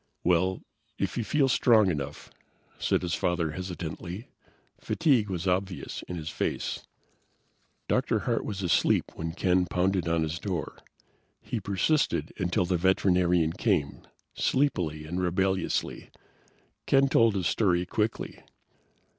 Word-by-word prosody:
"Well, 90 +2 +2 0.3
if - - -2
you 120 - -1
feel 135 +5 +2
strong 110 -6 +4
enough," 75 -2 -5 0.5
said - - +1
his 85 -2 -2
father 85 -3 0
hesitantly. 90 +3 -6 0.5
Fatigue 135 -11 +2
was 90 -1 -3
obvious 95 0 -2
in 90 - -5
his 80 -2 -5
face. - - -3 1.0
Dr. - - +1
Hart - - 0
was 100 -2 -4
asleep 85 -2 +2
when 80 0 -4
Ken 90 0 +2
pounded 90 -1 0
on 85 -1 +1
his 80 +2 -3
door. 90 -7 -4 0.6
He 120 - -4
persisted 100 - 0
until 90 -1 +1
the 90 0 +1
veterinarian 90 -2 +2
came, 90 -9 0 0.3
sleepily 90 - 0
and 90 +4 -3
rebelliously. 95 +2 -1 0.8
Ken 135 0 +5
told 115 -5 +4
his 95 -3 -1
story 90 -2 +2
quickly. 105 +5 -2
90 Hz, 125 wpm, -28 LUFS, 85-100 Hz, 1.0 s, Ken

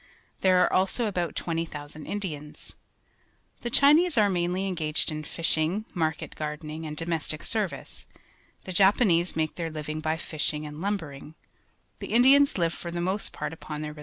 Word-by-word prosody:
There 185 -1 +4
are - - +1
also 195 +6 +2
about 175 -6 -2
20,000 155 -3 -4
Indians. 150 -8 -5 0.9
The 240 - -3
Chinese 300 +6 +5
are 205 -2 +5
mainly 180 +1 0
engaged 160 -4 -1
in 155 0 -4
fishing, 165 +5 0
market 160 -3 -2
gardening, 155 +1 -5
and 150 0 -6
domestic 165 -2 0
service; 215 -5 -3 0.6
the 185 - -6
Japanese 190 -2 +4
make 155 -1 0
their 165 -2 -2
living 155 0 -5
by 160 +1 -1
fishing 155 -2 -2
and 150 +1 -8
lumbering; 160 -7 -4 0.6
the - - -5
Indians 270 +3 +6
live 170 -2 +1
for 170 - -7
the 175 0 -4
most 190 +4 -1
part 150 +1 -4
upon 155 -1 -6
their 150 0 -5
re. 150 - -14
165 Hz, 160 wpm, -27 LUFS, 155-190 Hz, 0.9 s, Indians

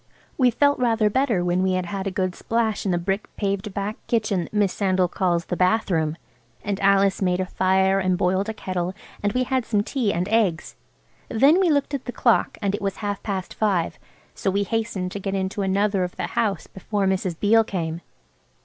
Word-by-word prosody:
We 255 -3 +4
felt 285 +4 +2
rather 225 -4 +2
better 230 -8 +1
when 180 +1 +1
we 190 0 +1
had 185 -1 -1
had 195 +2 -4
a - - +1
good 185 -1 -1
splash 220 0 -1
in - - +2
the 175 - +1
brick 195 +4 -2
paved 200 0 -2
back 200 +2 -3
kitchen 215 -6 0
that - - -15
Miss 205 -3 +2
Sandal 185 -2 +1
calls 175 -1 0
the - - -3
bath 185 +4 +2
room. 160 -2 0 0.5
And 200 -1 -2
Alice 195 0 +3
made 180 -1 +1
a 185 - 0
fire 190 +1 +2
and 185 -1 +1
boiled 190 +3 +1
a - - -2
kettle 185 -2 -3 0.3
and 205 - +1
we 255 - +1
had 260 0 0
some 210 -3 0
tea 235 -3 -1
and 175 +1 -1
eggs. 205 -8 +1 0.5
Then 280 +10 +5
we 375 -3 +3
looked 290 -1 +1
at 275 - -3
the - - -4
clock 235 -2 +2
and 200 -1 +1
it 205 - -3
was 195 -1 -2
half 205 -1 -2
past 190 -3 -4
five. 195 -6 0 0.3
So - - -1
we 200 +1 +1
hastened 210 -4 -2
to 200 - -5
get 195 0 -3
into 190 +1 -2
another 195 0 +1
of 180 - -4
the - - -3
house 205 -6 0
before 200 +1 -3
Mrs. 185 -3 -1
Beale 225 +2 +5
came. 170 -5 -4
195 Hz, 210 wpm, -23 LUFS, 185-220 Hz, 0.5 s, Then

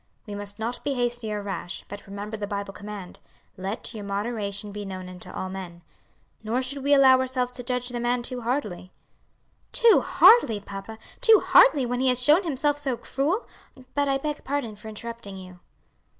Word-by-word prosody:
We 210 - -7
must 205 0 -6
not 230 +2 -4
be 280 -1 -1
hasty 240 -2 -1
or 210 -1 -3
rash, 195 -2 -5
but 205 0 -9
remember 205 +2 -6
the 210 -1 -4
Bible 200 -1 -4
command, 205 -3 -8 0.4
'Let 195 +6 -4
your 215 -2 -6
moderation 200 0 -3
be 205 0 -6
known 185 -2 -6
unto 180 -1 -10
all 185 - -4
men.' 180 -2 -8 0.6
Nor 235 +4 0
should 275 +1 -4
we 285 +1 +5
allow 265 -2 +7
ourselves 255 -1 -1
to 245 - -8
judge 250 0 -1
the 245 -1 -4
man 240 0 0
too 250 0 -5
hardly." 225 -7 -3 0.8
"Too 465 -2 +6
hardly, 275 - +6
papa! 200 +2 -8 0.2
too 450 -4 +7
hardly, 290 - +6
when 245 +1 -2
he 260 - +2
has 250 -1 +3
shown 300 +7 +6
himself 290 -3 0
so 270 -4 -2
cruel! 315 - -1 0.5
But 285 0 +1
I 270 0 +2
beg 295 +2 -4
pardon 270 -6 -2
for 215 - -12
interrupting 220 -2 -7
you." 185 -1 -11
235 Hz, 185 wpm, -25 LUFS, 200-265 Hz, 0.8 s, allow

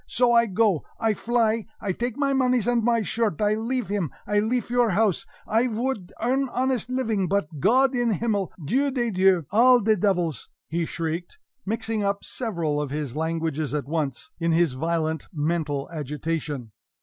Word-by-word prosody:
So 245 0 +2
I 235 0 +5
go 200 -4 +2 0.2
I 225 -1 +2
fly 225 0 0
I 200 - -2
take 240 +5 -3
my 280 -1 +1
moneys 255 -4 +2
and 240 -2 +2
my 230 -1 +2
shirt 220 -6 -1
I 210 0 +2
leafe 235 +2 -2
him, 200 -6 -1 0.2
I 210 0 +2
leafe 235 +3 -1
your 245 -2 +3
house! 200 -1 +1 0.2
I 230 +3 +2
vould 230 -5 -3
earn 260 +3 +1
honest 255 -1 0
living, 225 -7 0
but 165 -6 -1
Gott 260 - +4
im 240 -2 +1
himmel! 205 -2 0
Dieu 275 - +2
des 240 -4 -1
dieux! 185 -3 +3
All 245 +4 +6
de 220 0 +3
devils!" 180 -6 0 0.2
he 165 +1 -1
shrieked, 165 - -4 0.3
mixing 225 0 -1
up 200 0 -1
several 170 - -2
of 145 - -3
his 145 -2 -4
languages 160 -2 -2
at 145 - -2
once, 155 - -3
in 165 -1 +1
his 165 -4 +3
violent 160 +2 -1
mental 150 -3 -1
agitation. 150 -4 -4
205 Hz, 175 wpm, -25 LUFS, 165-235 Hz, 0.3 s, All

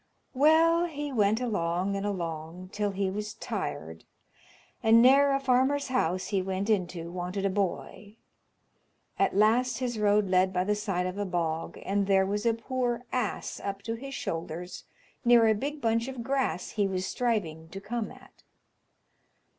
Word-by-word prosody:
Well, 325 +5 +4
he 295 -3 -5
went 215 -1 +2
along 195 -5 -1
and 195 +1 -2
along 170 -1 -5
till 210 0 -1
he 195 -1 -1
was 210 +1 -5
tired, 80 +1 -5 0.8
and 225 +1 +6
ne'er 275 +3 +6
a 275 - +2
farmer's 270 +2 +1
house 185 -8 0
he 195 -3 +1
went 190 +3 -2
into 175 -4 -1
wanted 180 +2 -3
a 195 - +1
boy 200 +2 -3 1.0
At - - +2
last 225 +5 +3
his 245 -3 -3
road 210 -1 +3
led 185 0 +3
by 180 -1 0
the 205 +2 +1
side 195 -4 -2
of 185 +2 -4
a 205 - -1
bog, 165 -2 -2
and 200 0 0
there 190 -1 +4
was 205 +3 -1
a 230 - +3
poor 245 +1 -2
ass 245 -5 -2
up 200 0 -5
to 225 - -3
his 270 +4 -7
shoulders 170 +2 -5 0.4
near 235 -1 +6
a 220 - +5
big 285 +7 -4
bunch 230 +1 +1
of 260 -3 -6
grass 265 -8 -1
he 205 -2 +1
was 185 -1 -2
striving 190 -9 -2
to 195 - -7
come 220 +3 -4
at. - - -17
205 Hz, 165 wpm, -28 LUFS, 185-245 Hz, 1.0 s, and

